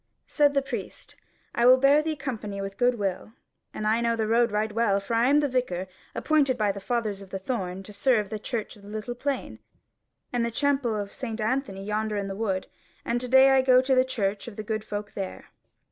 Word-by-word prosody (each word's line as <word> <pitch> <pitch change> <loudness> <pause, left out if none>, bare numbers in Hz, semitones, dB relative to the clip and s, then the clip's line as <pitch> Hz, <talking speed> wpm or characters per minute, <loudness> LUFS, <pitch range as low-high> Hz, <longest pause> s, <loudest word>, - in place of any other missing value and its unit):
Said 290 -1 +2
the 275 - +3
Priest: 240 -8 -7 0.4
"I 235 - +3
will 255 +1 +8
bear 275 +3 +5
thee 315 0 -2
company 225 -8 -5
with 195 0 -4
a - - -33
good 245 -1 +2
will; 200 +1 -3 0.4
and 215 - -5
I 220 +2 +2
know 235 0 +1
the 220 -1 -1
road 230 +1 +3
right 210 +1 0
well; 210 -2 +2
for 200 +4 -5
I 230 +2 +3
am 295 +1 +5
the 290 - +1
Vicar 245 -9 -1 0.3
appointed 285 -5 +2
by 210 -2 +2
the 200 - -7
fathers 210 -1 -2
of 195 - -12
the 195 - -4
Thorn 190 -3 -4
to 210 - -12
serve 210 -2 +1
the 215 - -3
church 225 0 -4
of 205 - -17
the 200 - -14
Little 215 +3 -4
Plain, 275 +3 -3 0.7
and 240 -1 +1
the 235 - 0
chapel 270 -2 0
of 205 -1 -4
St. 230 -3 -5
Anthony 220 -3 -1
yonder 210 +1 -1
in 200 -1 -2
the 195 - -5
wood, 195 -3 -1 0.4
and 240 +1 0
to 250 - -3
day 265 +2 +7
I 265 0 +5
go 255 -1 +5
to 260 +1 +1
the 255 0 +5
church 210 -6 -2
of 230 - -8
the 215 - -5
good 215 0 -3
folk 205 -1 -5
there." 195 -2 -6
225 Hz, 235 wpm, -26 LUFS, 205-255 Hz, 0.7 s, will